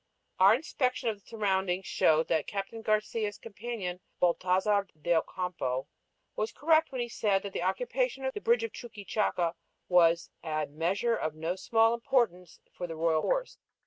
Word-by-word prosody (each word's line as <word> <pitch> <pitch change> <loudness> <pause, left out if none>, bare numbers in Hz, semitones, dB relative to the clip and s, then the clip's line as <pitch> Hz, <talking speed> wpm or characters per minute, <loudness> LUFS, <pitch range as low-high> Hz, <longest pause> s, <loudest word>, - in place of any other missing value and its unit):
Our 195 +3 +7
inspection 255 -3 -1
of 215 - -3
the - - -31
surroundings 190 -4 0
showed 160 +1 +3
that 160 - +1
Captain 205 +3 -4
Garcia's 215 -1 0
companion, 205 -4 -5 0.2
Baltasar 185 +3 +2
de 170 +3 +1
Ocampo, 160 -7 -1 0.5
was 215 +1 -1
correct 315 +1 +3
when 255 -2 -2
he 240 - -1
said 205 -4 +1
that 200 -1 -6
the - - -2
occupation 250 +7 -1
of 265 - -1
the 415 - -5
bridge 470 +2 +3
of 455 - -3
Chuquichaca 205 -6 -2 0.3
"was 170 -2 +4
a 155 -2 -1
measure 180 +11 0
of 155 -7 -3
no 165 +3 -2
small 225 +4 +3
importance 225 -8 0
for 175 - -5
the 165 - -6
royal 160 -1 +2
force." - - -1
200 Hz, 160 wpm, -30 LUFS, 175-235 Hz, 0.5 s, Our